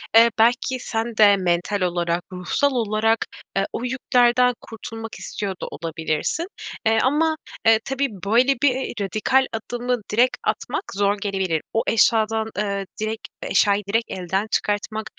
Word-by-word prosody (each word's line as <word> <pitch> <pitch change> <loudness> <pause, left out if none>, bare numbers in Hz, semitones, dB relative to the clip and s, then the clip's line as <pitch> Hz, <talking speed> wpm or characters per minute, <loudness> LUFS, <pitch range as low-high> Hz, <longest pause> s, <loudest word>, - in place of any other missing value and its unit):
eee, 230 +1 +8
belki, 245 +3 +3
sen 225 -1 -3
de 205 -2 +7
mental 180 +2 0
olarak, 175 -1 0
ruhsal 185 +10 0
olarak, 225 -2 +1 0.4
eee, 195 - +2
o - - -3
yüklerden 250 -1 +3
kurtulmak 225 0 -8
istiyor 195 -2 -4
da - - -3
olabilirsin. 160 - -3 0.4
Eee, 225 0 +4
ama, 315 +4 +2 0.3
eee, 225 -1 +6
tabii, 270 +1 0 0.2
böyle, 245 +6 +4
bir, 285 - +7
eee, 265 - -3
radikal 215 +7 +2
adımı 245 +2 -2
direkt 245 +4 +3
atmak - - -2
zor 200 +1 +1
gelebilir. 190 -6 -1
O 225 - +1
eşyadan, 220 0 +3
eee, 200 -1 -1 0.2
direkt 215 +1 -3
eşyayı 205 0 +2
direkt 225 +3 0
elden 190 +3 -2
çıkartmak, 215 +1 -1
220 Hz, 140 wpm, -22 LUFS, 200-245 Hz, 0.4 s, eee